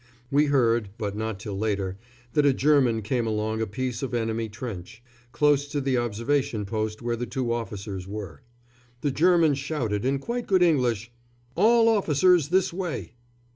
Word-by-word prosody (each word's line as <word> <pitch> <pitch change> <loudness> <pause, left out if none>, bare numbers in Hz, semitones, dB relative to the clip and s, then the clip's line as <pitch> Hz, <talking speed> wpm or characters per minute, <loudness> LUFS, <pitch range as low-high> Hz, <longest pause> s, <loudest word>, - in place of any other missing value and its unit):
We 145 +2 +4
heard, 120 -6 +2
but 105 -3 -3
not 110 -2 -3
till 105 -1 -6
later, 100 -3 -1 0.4
that 150 - +3
a 140 -1 +4
German 130 -6 +3
came 120 +1 -1
along 110 0 -1
a 110 - -1
piece 125 +2 -3
of 130 -3 -3
enemy 115 -1 -1
trench, 110 -1 -8 0.3
close 145 +2 +2
to 145 0 -2
the 135 -2 +1
observation 115 0 -1
post 110 +2 -3
where 120 0 0
the 120 +1 -4
two 125 -4 -2
officers 100 -5 -5
were. 100 -7 -7 0.6
The 145 - 0
German 165 0 +4
shouted, 135 -7 -2
in 135 +2 +1
quite 235 - -4
good 185 -2 +4
English, 120 - +1 0.4
"All 230 +1 +5
officers 180 -6 +3
this 185 0 +2
way!" 175 -7 -4
120 Hz, 165 wpm, -26 LUFS, 110-145 Hz, 0.6 s, All